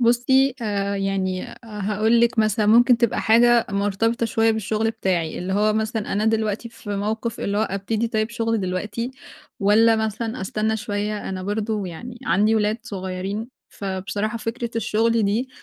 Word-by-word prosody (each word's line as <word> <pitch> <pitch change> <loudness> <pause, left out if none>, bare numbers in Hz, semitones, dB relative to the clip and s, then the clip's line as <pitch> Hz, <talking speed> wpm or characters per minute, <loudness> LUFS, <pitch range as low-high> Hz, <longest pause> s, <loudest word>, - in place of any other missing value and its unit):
بُصِّي، 250 +3 +3
آآ، 200 -2 -1
يعني 190 -1 -2
هاقول 215 +1 +1
لِك 235 0 +2
مثلًا، 215 0 +2
ممكن 240 +3 +6
تبقى 235 -2 +1
حاجة 235 +1 +5
مرتبطة 205 +4 0
شوية 225 0 +2
بالشغل 220 0 0
بتاعي، 175 -7 -1
اللي 185 +2 -3
هو 210 +2 +3
مثلًا، 220 0 -2
أنا 210 +2 0
دلوقتي 220 0 0
في 220 -2 -10
موقف 220 +3 -2
اللي 200 +1 -1
هو - - +2
ابتدي 215 +3 -1
طيب 220 0 -1
شغلي 230 -1 0
دلوقتي 205 +6 -3 0.5
والّا 220 +3 +5
مثلًا 220 +2 -2
أستنى 215 +3 -1
شوية، 210 0 -3
أنا 185 -1 -4
برضه 205 +1 -2
يعني 235 +8 -8
عندي 210 +3 +3
ولاد 215 +1 +1
صغيِّرين، 195 0 -4 0.2
فبصراحة 200 +3 -3
فكرة 230 +1 -4
الشغل 225 +1 +1
دي، 215 +6 0
215 Hz, 155 wpm, -23 LUFS, 200-230 Hz, 0.5 s, ممكن